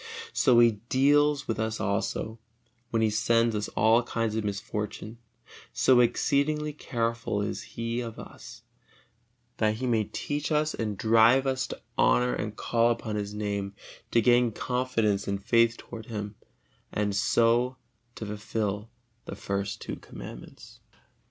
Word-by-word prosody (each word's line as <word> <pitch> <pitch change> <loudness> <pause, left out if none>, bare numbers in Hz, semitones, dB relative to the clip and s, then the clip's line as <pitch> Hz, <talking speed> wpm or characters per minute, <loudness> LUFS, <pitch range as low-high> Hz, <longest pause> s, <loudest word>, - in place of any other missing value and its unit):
So 125 -2 +4
He 120 -1 +7 0.2
deals 145 +2 +3
with 115 -1 -2
us 110 0 -2
also, 105 +2 -2 0.5
when 115 -1 +1
He 110 - +2
sends 115 +1 +2
us 105 -1 -2
all 110 +3 +5
kinds 115 -2 -2
of 110 - -1
misfortune: 105 +2 -4 0.5
so 130 -2 +4
exceedingly 150 +5 +1
careful 115 -6 -2
is - - -3 0.2
He 115 +1 -2
of 115 -2 -7
us, - - -11 0.9
that 110 -1 +2
He 125 +4 -4
may 115 -4 +1
teach 145 +8 -4
us 155 0 +1
and 105 -3 -3
drive 115 +5 +5
us 130 -1 0
to - - -7 0.2
honor 125 0 +4
and 105 0 -4
call 115 +1 +2
upon 115 -2 -2
His 105 0 -4
Name, 100 -1 -3 0.3
to 115 - +3
gain 120 0 +4
confidence 125 -6 0
and 100 0 -2
faith 115 -1 +3
toward 110 -2 -10
Him, 105 -2 -5 0.6
and 105 -1 -1
so 120 +4 +2 0.4
to 110 - -6
fulfil 105 0 -3 0.4
the - - -6
first 100 0 -3
two - - -5
Commandments. - - -11
115 Hz, 145 wpm, -28 LUFS, 105-125 Hz, 0.9 s, He